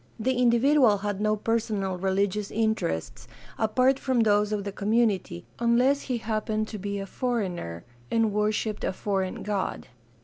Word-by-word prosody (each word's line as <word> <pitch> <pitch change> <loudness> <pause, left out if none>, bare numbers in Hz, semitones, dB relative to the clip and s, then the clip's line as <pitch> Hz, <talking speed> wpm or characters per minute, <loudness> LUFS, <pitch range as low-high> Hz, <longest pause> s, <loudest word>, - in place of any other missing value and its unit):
The 260 +4 +1
individual 245 -1 +4
had 205 0 -3
no 215 0 +2
personal 215 -3 -1
religious 195 +2 0
interests 220 - -2 0.3
apart 255 +5 +2
from 260 -4 +1
those 210 -1 +3
of 210 -1 -1
the 200 - -4
community, 205 - 0
unless 245 +4 +3
he 250 -3 -2
happened 215 -1 -2
to 215 - -6
be 200 +1 -3
a 195 - -4
foreigner 185 - -3 0.3
and 225 -2 +1
worshiped 210 0 -1
a - - 0
foreign 190 -1 -2
god. 205 -2 -3
215 Hz, 145 wpm, -26 LUFS, 200-235 Hz, 0.3 s, individual